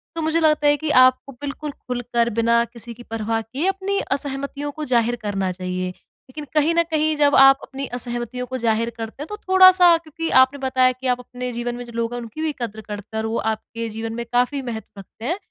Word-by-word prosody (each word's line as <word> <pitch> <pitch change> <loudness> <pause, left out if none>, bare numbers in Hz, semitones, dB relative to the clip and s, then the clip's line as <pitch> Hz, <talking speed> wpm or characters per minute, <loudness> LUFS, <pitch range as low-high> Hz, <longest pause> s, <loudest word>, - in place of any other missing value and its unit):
तो 330 - -2
मुझे 320 +1 +1
लगता 305 -2 +3
है 290 - +4
कि 310 +1 -4 0.2
आपको 255 +2 +1
बिल्कुल 290 +1 -5
खुलकर 245 -3 -2
बिना 235 0 +3
किसी 235 0 -8
की 240 +1 -13
परवाह 225 0 -2
किए 265 - -3
अपनी 390 +1 -1
असहमतियों 280 +1 -3
को 305 +1 -6
ज़ाहिर 240 -1 +2
करना 195 -3 -1
चाहिए। 185 0 -3 0.4
लेकिन 300 +3 -8
कहीं 310 +2 +3
न 335 - +4
कहीं 310 0 +1
जब 290 -1 +4
आप 270 +1 +7
अपनी 275 0 -6
असहमतियों 240 0 -4
को 260 - -4
ज़ाहिर 230 -1 +1
करते 225 +5 -6
हैं - - -9
तो 420 - -5
थोड़ा-सा 370 -2 +7
क्योंकि 330 0 -5
आपने 265 +2 +2
बताया 255 -1 +3
कि 255 +1 -6
आप 250 0 +1
अपने 250 0 -6
जीवन 240 +1 -3
में 245 - -6
जो 235 - -11
लोग 230 0 -1
हैं 245 - -3
उनकी 230 +7 -8
भी 315 - 0
कदर 220 -2 -4
करते 210 +1 -7
है - - 0
और - - -2
वो 230 - -1 0.2
आपके 230 +1 -6
जीवन 225 +1 -5
में 235 0 -4
काफ़ी 250 +3 +1
महत्व 220 -4 -7
रखते 220 +3 -11
हैं। 345 +8 -1
250 Hz, 225 wpm, -22 LUFS, 230-295 Hz, 0.4 s, आप